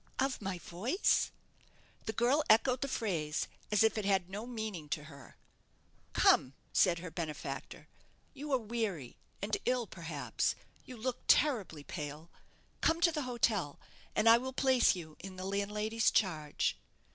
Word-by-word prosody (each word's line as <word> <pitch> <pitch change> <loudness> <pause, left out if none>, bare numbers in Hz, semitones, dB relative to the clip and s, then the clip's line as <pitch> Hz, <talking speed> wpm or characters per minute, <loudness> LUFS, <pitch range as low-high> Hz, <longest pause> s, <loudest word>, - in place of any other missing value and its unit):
"Of 270 -2 0
my 190 -3 -3
voice!" 205 - +1 0.8
The - - +1
girl 250 +8 +3
echoed 245 +3 +5
the 280 - 0
phrase 170 - -1 0.2
as 210 +1 +4
if 220 0 +3
it - - -3
had 190 -2 +1
no 210 +4 -5
meaning 215 -10 -5
to 150 - -2
her. 140 -3 -13 0.8
"Come," 130 - +4 0.2
said 180 -3 +4
her 170 0 -7
benefactor, 160 -2 -5 0.5
"you 290 +1 -6
are 265 - +5
weary, 215 - -3 0.3
and 210 +1 +1
ill, 250 -1 +1
perhaps. 160 - -2 0.3
You 255 - -9
look 250 +2 -2
terribly 210 - +3
pale. 150 +3 -7 0.5
Come 325 +1 +3
to 340 -1 +5
the 305 -2 -2
hotel, 215 -10 0 0.4
and 215 - +3
I 230 +1 +8
will 260 +1 -5
place 260 -5 +4
you 160 -4 -9
in 190 -1 -8
the 185 0 -6
landlady's 210 +3 +1
charge." 155 -7 0
210 Hz, 150 wpm, -33 LUFS, 170-240 Hz, 0.8 s, I